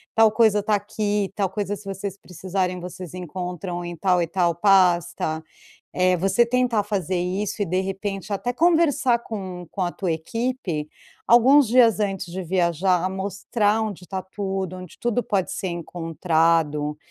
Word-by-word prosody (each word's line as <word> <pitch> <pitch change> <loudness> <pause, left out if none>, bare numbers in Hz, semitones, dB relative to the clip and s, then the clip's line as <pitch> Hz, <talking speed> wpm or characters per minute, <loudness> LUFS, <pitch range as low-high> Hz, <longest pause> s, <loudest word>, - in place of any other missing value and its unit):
"Tal 225 -1 +6
coisa 215 -2 +3
tá 215 - 0
aqui. 205 -1 -1
Tal 200 -2 +1
coisa, 205 +1 -3
se 200 +1 -13
vocês 195 0 -5
precisarem, 185 0 -3
vocês 180 -1 -8
encontram 180 0 -5
em 175 0 -5
tal 180 +1 +2
e - - +1
tal 175 -2 +1
pasta". 175 -4 +2 0.5
Eh, 185 0 +3
você 195 +6 +3
tentar 245 -3 +1
fazer 190 -3 -2
isso 190 +4 -2
e, - - -1
de 185 +3 0
repente, 195 +1 -4
até 245 +5 -1
conversar 310 -6 +3
com 185 -6 -6
com 195 - -6
a 175 - 0
tua 180 -4 -2
equipe, 180 - -3 0.4
alguns 260 +4 +6
dias 230 -2 +5
antes 195 -3 -1
de 190 +1 -4
viajar. 180 +1 +1
Mostrar 205 +3 0
onde 195 -4 -5
tá 190 -1 -4
tudo, 190 -2 -4
onde 185 -3 -11
tudo 240 0 0
pode 200 -5 -1
ser 190 - -3
encontrado 165 -3 0
190 Hz, 160 wpm, -23 LUFS, 175-210 Hz, 0.5 s, Tal